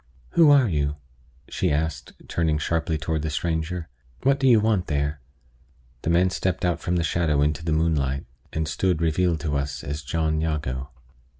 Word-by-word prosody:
"Who 165 -3 +5
are 140 -4 +6
you?" 75 -5 0 0.5
she - - -1
asked, 75 -3 -2
turning 80 -3 +1
sharply 80 +1 -1
toward 80 +1 -2
the 80 - -2
stranger. 80 +2 -2 0.4
"What 135 +1 +3
do 135 - +3
you 120 -4 +7
want 105 -4 +1
there?" 75 -1 -1 0.8
The - - -2
man 90 +2 +3
stepped 95 -2 -1
out 90 -1 +1
from 90 - -1
the 85 - +1
shadow 80 -3 +1
into 75 +1 0
the 80 - -1
moonlight, 75 -4 +1 0.3
and 80 0 -2
stood 90 +2 0
revealed 85 0 +1
to 75 -4 -1
us 70 0 -2
as 75 +2 -4
John 80 +1 -1
Jago. 70 -4 -2
80 Hz, 175 wpm, -24 LUFS, 75-85 Hz, 0.8 s, you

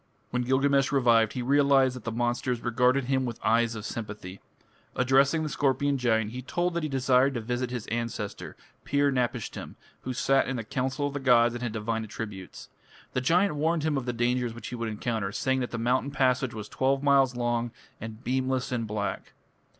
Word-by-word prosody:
When 125 - 0
Gilgamesh 135 +2 +2
revived, 115 -5 +3
he 125 - -3
realized 135 -1 +4
that 125 - -10
the 115 - -2
monsters 120 +1 -1
regarded 125 +3 +2
him 130 +1 0
with 120 -3 -4
eyes 115 +1 +2
of 110 -1 -6
sympathy. 105 -5 -6 0.6
Addressing 135 +5 +3
the - - -2
scorpion 140 0 +1
giant, 110 -3 +1
he 125 +2 -6
told 175 +7 -1
that 170 - -1
he 155 - -2
desired 135 0 +3
to - - -1
visit 120 +2 -2
his 125 -3 -4
ancestor, 115 -3 -4 0.3
Pir 140 0 +2
napishtim, 125 -2 -3 0.3
who 130 - -4
sat 135 +2 +2
in 135 - -2
the 115 - -3
council 130 +5 -2
of 145 - -3
the 145 - -3
gods 120 -3 +4
and 120 - -6
had 120 -3 -3
divine 115 +1 -2
attributes. 105 -4 -8 0.5
The 130 - 0
giant 175 +7 +3
warned 160 +1 +1
him 155 -1 +1
of 130 -2 -3
the - - +1
dangers 120 0 0
which 120 - -7
he 125 - -5
would 115 -1 -3
encounter, 110 -2 -2
saying 130 +5 0
that 125 - -2
the 120 - -4
mountain 125 +4 +1
passage 130 -3 +1
was 105 -1 -6
twelve 135 +3 0
miles 135 -3 +4
long 120 -1 -1 0.3
and 110 +2 -8
beamless 130 +1 -1
and 115 -3 -2
black. 105 -1 -4
125 Hz, 195 wpm, -27 LUFS, 115-135 Hz, 0.6 s, realized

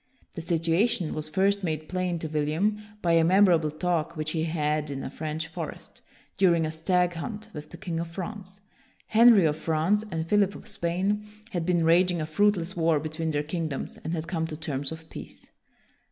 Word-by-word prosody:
The 165 - -5
situation 165 +3 +1
was 155 0 -3
first 195 +4 +2
made 155 -3 -2
plain 185 -1 -1
to 160 - -4
William 155 +8 0 0.2
by 170 - +2
a 165 0 +5
memorable 175 -3 +4
talk 170 +1 -1
which 155 0 -2
he 160 -1 -1
had 150 -2 -1
in 135 -1 -4
a - - -5
French 155 +1 -4
forest, 165 -1 -8 0.4
during 170 -4 +4
a 155 - -2
stag 175 +2 +1
hunt, 215 +5 -6
with 150 0 -8
the 175 - -10
king 165 -1 -4
of 170 - -3
France. 190 +2 -7 0.4
Henry 225 -4 +6
of 150 -1 +1
France 165 +7 +1
and 160 -3 -2
Philip 200 +2 +2
of - - -10
Spain 195 +5 -1 0.2
had 175 -2 -2
been 175 -2 +2
raging 175 +1 +4
a 155 - -1
fruitless 185 +2 +1
war 165 -2 +2
between 160 +2 -3
their 145 -1 0
king 165 +2 -2
doms, 140 -3 -5
and 160 - -5
had 165 -1 -3
come 165 -2 -1
to 155 - -6
terms 145 -3 -3
of 160 0 -9
peace. - - -10
165 Hz, 195 wpm, -27 LUFS, 155-185 Hz, 0.4 s, Henry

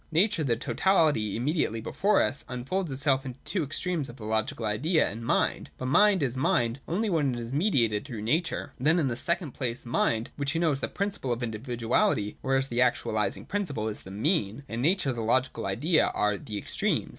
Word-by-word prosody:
Nature, 170 +1 +3
the 120 -5 +1
totality 150 - +2
im 115 - -2
mediately 150 -7 0
before 200 - +2
us, 140 - -2
unfolds 145 +9 -2
itself 135 0 +2
into 130 -2 -7
the - - -34
two 185 -5 0
extremes 155 +1 -2
of 120 - -9
the 110 - -9
Logical 110 +4 -1
Idea 150 - +2
and 115 +3 -6
Mind. - - 0
But 130 - -3
Mind 200 +2 +5
is 130 -2 -1
Mind 120 -1 +1
only 205 +7 0
when 150 -9 +1
it - - -4
is 120 +2 -6
mediated 130 - +2
through 110 -4 -7
nature. 160 +10 -1
Then, 155 +6 +3
in 150 -6 +1
the 120 - -2
second 170 +3 0
place. 125 -2 -2
Mind, 115 -1 0
which 140 +1 -2
we - - +1
know 165 -2 +3
as 135 - -2
the - - -1
principle 200 -10 -3
of 120 +1 -2
individuality, 115 -2 0
or 135 0 0
as 135 0 +1
the 120 -2 -2
actualising 110 -4 0
principle, 145 - -2
is 110 - -4
the - - -11
mean; 110 - 0
and 115 0 -4
Nature 170 +1 +2
and 120 -3 -2
the - - -1
Logical 130 0 0
Idea 150 - +2
are 105 0 +2
the 105 -1 -6
extremes. - - -1
130 Hz, 215 wpm, -28 LUFS, 115-160 Hz, -, Mind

